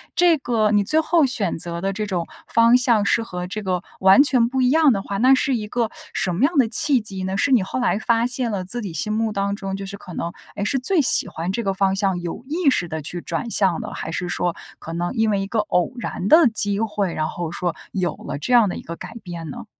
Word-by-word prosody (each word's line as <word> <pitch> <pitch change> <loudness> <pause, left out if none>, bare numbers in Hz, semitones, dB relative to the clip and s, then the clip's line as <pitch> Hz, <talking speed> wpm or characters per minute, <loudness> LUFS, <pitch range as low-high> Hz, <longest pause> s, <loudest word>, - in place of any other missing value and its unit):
这 345 -3 +4
个 225 -5 0
你 205 -1 +3
最 310 +10 +2
后 320 -1 +3
选 225 - -1
择 170 +1 -4
的 195 - -1
这 210 +1 -3
种 180 -4 -3 0.2
方 230 +2 +5
向 235 -5 +2
是 230 - +2
和 180 -4 -6
这 210 +3 -5
个 185 -2 -1 0.2
完 190 +7 +7
全 250 -5 +2
不 260 0 -1
一 250 - +3
样 310 0 +5
的 195 - -2
话， 200 0 -4
那 255 +5 +5
是 265 0 +2
一 210 -2 -4
个 235 0 -1 0.2
什 180 -2 0
么 215 - 0
样 310 +1 +2
的 250 -4 +5
契 265 0 +2
机 195 -3 -5
呢？ 190 +1 -2
是 275 - +1
你 240 -7 +4
后 195 - -4
来 245 - +1
发 230 +2 +1
现 250 -2 -1
了 195 -2 -2
自 235 +6 -1
己 190 -6 -6
心 190 +7 -2
目 220 0 0
当 200 0 -1
中 195 -2 -5
就 195 0 -6
是 200 +1 -7
可 185 -3 -11
能， 170 +1 -3 0.2
哎， 200 - -3
是 270 +6 0
最 315 +6 +2
喜 255 - +2
欢 170 +3 -4
这 235 +4 -2
个 195 -2 0
方 195 0 +1
向， 195 -2 0
有 175 +7 -6
意 320 +1 +1
识 175 -9 0
地 160 -1 -5
去 175 +4 -5
转 235 - -3
向 190 -6 +1
的， - - -7
还 160 - -5
是 180 +2 -3
说 175 0 -1 0.2
可 165 - -8
能 175 +1 -2
因 225 -3 +1
为 200 - 0
一 195 - -4
个 225 - -3
偶 210 +1 0
然 200 -5 -4
的 320 +1 +7
机 205 -2 0
会， 210 -5 -1
然 155 0 -1
后 170 -2 -5
说 175 -1 -2 0.2
有 185 -3 -1
了 - - -6
这 160 - -2
样 230 -4 +6
的 - - -4
一 - - -6
个 170 - -7
改 230 - -10
变 170 -3 -7
呢？ 140 - -8
205 Hz, 290 characters per minute, -22 LUFS, 180-245 Hz, 0.2 s, 完